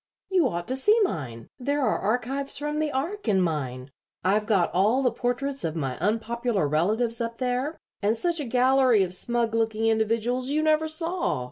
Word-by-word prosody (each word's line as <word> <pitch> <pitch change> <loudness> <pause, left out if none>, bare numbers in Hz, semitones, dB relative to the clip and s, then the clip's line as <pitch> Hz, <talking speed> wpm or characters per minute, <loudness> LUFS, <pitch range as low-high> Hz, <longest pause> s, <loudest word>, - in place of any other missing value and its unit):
"You 360 -7 +4
ought 175 0 -4
to 260 - 0
see 420 +12 +4
mine. 120 - -4
There 285 +3 -1
are - - +1
archives 250 +6 -1
from 295 +1 -2
the 310 -1 0
Ark 330 +9 -3
in 200 -3 +3
mine. 135 -7 -2 0.3
I've 205 +4 +1
got 195 -6 +2
all 215 +9 +2
the 250 - +3
portraits 255 +4 -2
of 160 -1 -2
my 135 -5 -2
unpopular 220 -1 0
relatives 220 - +1
up 230 0 -3
there, 255 +4 -2 0.2
and 215 +3 +1
such 340 +4 0
a 295 - -3
gallery 255 -2 +4
of 180 -1 -3
smug 235 +3 0
looking 225 -1 0
individuals 230 +3 +1
you 305 +2 +1
never 310 0 +2
saw. 330 - -1
235 Hz, 180 wpm, -26 LUFS, 205-275 Hz, 0.3 s, You